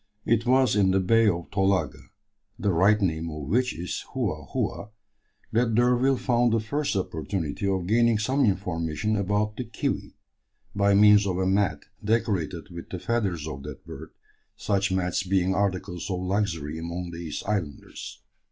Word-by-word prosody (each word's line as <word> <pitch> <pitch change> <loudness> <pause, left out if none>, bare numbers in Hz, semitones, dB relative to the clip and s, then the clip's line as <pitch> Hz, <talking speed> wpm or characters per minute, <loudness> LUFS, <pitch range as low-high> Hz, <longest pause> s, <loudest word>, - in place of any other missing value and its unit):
It 115 +1 +1
was 130 -3 +4
in 100 -2 +4
the 95 +1 +3
Bay 115 +4 +4
of 85 -4 -1
Tolaga, 95 -9 +1 0.6
the 100 - 0
right 100 +5 +4
name 85 -4 -1
of 75 -2 -6
which 125 - +1
is 90 +1 -4
Houa - - -2
Houa, 100 - -2 0.6
that 115 0 +2
D'Urville 125 +3 +3
found 120 -2 +2
the 115 - +3
first 140 +5 -2
opportunity 85 -1 -2
of 95 -2 0
gaining 115 +3 +3
some 130 +6 +1
information 95 -1 0
about 105 +2 0
the 125 - -2
"kiwi," 115 -3 -3 0.6
by 100 0 +3
means 105 0 +6
of 90 -2 -1
a 95 - 0
mat 95 0 +1 0.2
decorated 100 -5 -1
with 85 -1 -9
the 90 - -4
feathers 95 -7 -1
of 70 -3 -6
that 75 0 -9
bird, - - -9 0.5
such 100 -1 0
mats 90 -1 0
being 95 0 +1
articles 95 -2 -2
of 90 -1 -2
luxury 90 -6 -1
among 85 +1 -5
these 85 -3 -5
islanders. 95 -9 -4
100 Hz, 160 wpm, -26 LUFS, 85-110 Hz, 0.6 s, means